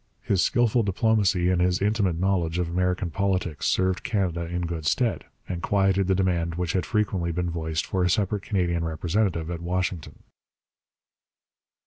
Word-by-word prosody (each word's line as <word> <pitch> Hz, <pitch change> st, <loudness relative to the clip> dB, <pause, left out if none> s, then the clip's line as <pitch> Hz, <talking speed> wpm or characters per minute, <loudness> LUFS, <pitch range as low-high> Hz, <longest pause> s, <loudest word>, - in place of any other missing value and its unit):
His 100 Hz, -6 st, +1 dB
skilful 120 Hz, 0 st, +2 dB
diplomacy 100 Hz, -3 st, +2 dB
and 90 Hz, -1 st, +2 dB
his 90 Hz, 0 st, +2 dB
intimate 100 Hz, -4 st, +1 dB
knowledge 90 Hz, -3 st, 0 dB
of 90 Hz, -1 st, 0 dB
American 90 Hz, 0 st, -1 dB
politics 95 Hz, -3 st, -1 dB
served 95 Hz, 0 st, +1 dB
Canada 95 Hz, -8 st, -1 dB
in 90 Hz, +1 st, -3 dB
good 85 Hz, -3 st, -3 dB
stead, 120 Hz, +4 st, 0 dB, 0.2 s
and 85 Hz, -2 st, -4 dB
quieted 95 Hz, -1 st, +2 dB
the 95 Hz, -, +3 dB
demand 85 Hz, -3 st, 0 dB
which 90 Hz, -2 st, -2 dB
had 95 Hz, -, -1 dB
frequently 100 Hz, -6 st, 0 dB
been 85 Hz, +1 st, -2 dB
voiced 80 Hz, -1 st, -2 dB
for 95 Hz, -1 st, -1 dB
a 90 Hz, -, +2 dB
separate 100 Hz, +2 st, 0 dB
Canadian 85 Hz, -4 st, 0 dB
representative 85 Hz, +1 st, -1 dB
at 85 Hz, -1 st, -5 dB
Washington. 90 Hz, -2 st, -2 dB
90 Hz, 155 wpm, -25 LUFS, 85-100 Hz, 0.2 s, the